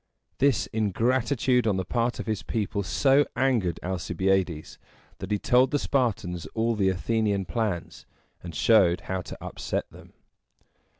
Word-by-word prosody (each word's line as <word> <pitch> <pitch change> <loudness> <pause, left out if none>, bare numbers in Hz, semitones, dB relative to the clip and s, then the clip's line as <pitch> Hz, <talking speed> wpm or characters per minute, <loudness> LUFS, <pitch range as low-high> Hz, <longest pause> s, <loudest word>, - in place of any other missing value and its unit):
This 140 -2 +3
ingratitude 120 +3 +1
on 100 -3 +1
the 95 - -2
part 120 +4 -1
of - - -4
his 110 -2 -2
people 105 -2 -2
so 135 +8 +3
angered 120 -10 +1
Alcibiades, 95 -2 -1 0.4
that 95 - -6
he 105 - +1
told 125 +5 +3
the 145 - +1
Spartans 105 - -1
all 115 +1 +1
the 100 -2 +2
Athenian 100 +1 0
plans, 95 -1 -3 0.3
and 85 -2 -8
showed 95 -3 +4
how 95 -1 -3
to - - -9
upset - - -4
them. - - -15
105 Hz, 140 wpm, -26 LUFS, 95-120 Hz, 0.4 s, showed